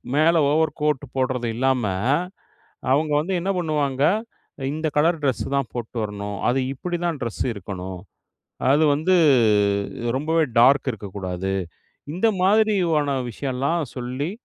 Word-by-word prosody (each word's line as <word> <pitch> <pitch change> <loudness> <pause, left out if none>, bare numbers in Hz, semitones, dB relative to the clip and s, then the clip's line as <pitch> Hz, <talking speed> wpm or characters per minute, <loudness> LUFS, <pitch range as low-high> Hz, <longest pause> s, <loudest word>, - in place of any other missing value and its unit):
மேல 160 +3 +4 0.2
over 160 0 +2
coat 150 -2 +1
போட்றது 130 -2 -1
இல்லாம, 130 0 +1 1.1
அவங்க 150 +3 +2
வந்து 170 +6 -2
என்ன 195 +3 -1
பண்ணுவாங்க. 145 -5 0 0.7
"இந்த 155 +1 -2
கலர் 165 +2 +3
ட்ரெஸ்ஸு 135 -3 0
தான் 140 -4 -1
போட்டு 120 0 -6
வரணும். 105 -1 -5
அது 130 +2 +1
இப்படி 175 +5 -4
தான் 165 -4 -1
ட்ரெஸ்ஸு 115 0 -3
இருக்கணும். 95 -2 -7 0.7
அது 150 +3 +4
வந்து 160 +6 +2 1.0
ரொம்பவே 160 +3 +1 0.2
டார்க் 135 +3 +5
இருக்கக்கூடாது" 95 -2 -5 0.6
இந்த 190 +6 +1 0.2
மாதிரியான 185 -9 +2
விஷயம்லாம் 140 +7 -1
சொல்லி 130 +5 -3
140 Hz, 120 wpm, -23 LUFS, 120-160 Hz, 1.1 s, டார்க்